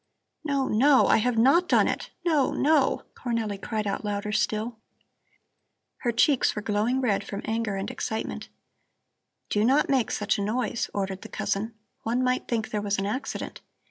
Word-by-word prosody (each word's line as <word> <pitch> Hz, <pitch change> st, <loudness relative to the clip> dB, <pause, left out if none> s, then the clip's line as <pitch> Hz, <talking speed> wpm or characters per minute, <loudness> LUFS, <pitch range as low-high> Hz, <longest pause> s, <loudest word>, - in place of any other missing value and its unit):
'" -, -, -55 dB
"No, 280 Hz, -3 st, 0 dB
no! 260 Hz, +5 st, +5 dB
I -, -, +5 dB
have 240 Hz, +1 st, +1 dB
not 275 Hz, +10 st, +4 dB
done -, -, +4 dB
it. -, -, -3 dB, 0.2 s
No, 305 Hz, -6 st, +2 dB
no!" 295 Hz, -1 st, +2 dB
Cornelli 225 Hz, -5 st, -3 dB
cried 215 Hz, -2 st, -2 dB
out 200 Hz, +1 st, -2 dB
louder 205 Hz, 0 st, -2 dB
still. 220 Hz, +2 st, -1 dB, 1.2 s
Her 240 Hz, -, -1 dB
cheeks 260 Hz, +3 st, +3 dB
were 210 Hz, -, -3 dB
glowing 220 Hz, +5 st, +1 dB
red 205 Hz, -6 st, +1 dB
from 200 Hz, 0 st, -6 dB
anger 220 Hz, -2 st, -1 dB
and 195 Hz, +1 st, -3 dB
excitement. 220 Hz, 0 st, -4 dB, 1.0 s
"Do 210 Hz, -, +1 dB
not 270 Hz, +6 st, +3 dB
make 265 Hz, -4 st, +2 dB
such 205 Hz, 0 st, 0 dB
a -, -, 0 dB
noise," 230 Hz, +2 st, -1 dB
ordered 195 Hz, -1 st, -3 dB
the -, -, -10 dB
cousin. 220 Hz, +3 st, -2 dB, 0.3 s
"One 240 Hz, +3 st, 0 dB
might 255 Hz, 0 st, 0 dB
think 225 Hz, -2 st, -2 dB
there 210 Hz, -, -1 dB
was 205 Hz, 0 st, -1 dB
an 195 Hz, -, -1 dB
accident. 225 Hz, +7 st, -4 dB
225 Hz, 175 wpm, -26 LUFS, 210-255 Hz, 1.2 s, no